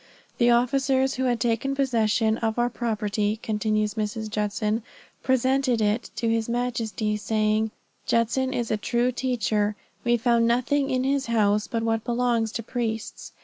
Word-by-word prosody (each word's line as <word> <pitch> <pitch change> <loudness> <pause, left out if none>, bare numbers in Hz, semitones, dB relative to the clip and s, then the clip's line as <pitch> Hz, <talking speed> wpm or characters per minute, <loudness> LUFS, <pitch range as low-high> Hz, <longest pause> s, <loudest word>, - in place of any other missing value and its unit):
"The 240 -1 +5
officers 265 +2 +2
who 260 0 -1
had 240 -2 +1
taken 240 +4 0
possession 225 -4 +1
of 225 0 -1
our 240 0 +1
property," 215 -2 -1
continues 215 -1 0
Mrs. 215 0 -3
Judson, 210 +1 -1 0.4
"presented 260 -1 +2
it 215 +2 0
to 230 - -1
his 225 0 0
majesty, 230 -3 -1
saying, 215 0 +1 0.4
'Judson 245 +3 +1
is 240 -3 -2
a 215 - +1
true 240 +3 0
teacher; 220 -5 0 0.3
we 240 0 +3
found 235 0 +2
nothing 265 +4 +1
in 255 0 0
his 275 -1 0
house 210 -2 +2
but 230 -1 -2
what 225 -1 0
belongs 240 -2 0
to 230 - -3
priests. 225 -2 -4
230 Hz, 150 wpm, -25 LUFS, 215-245 Hz, 0.4 s, The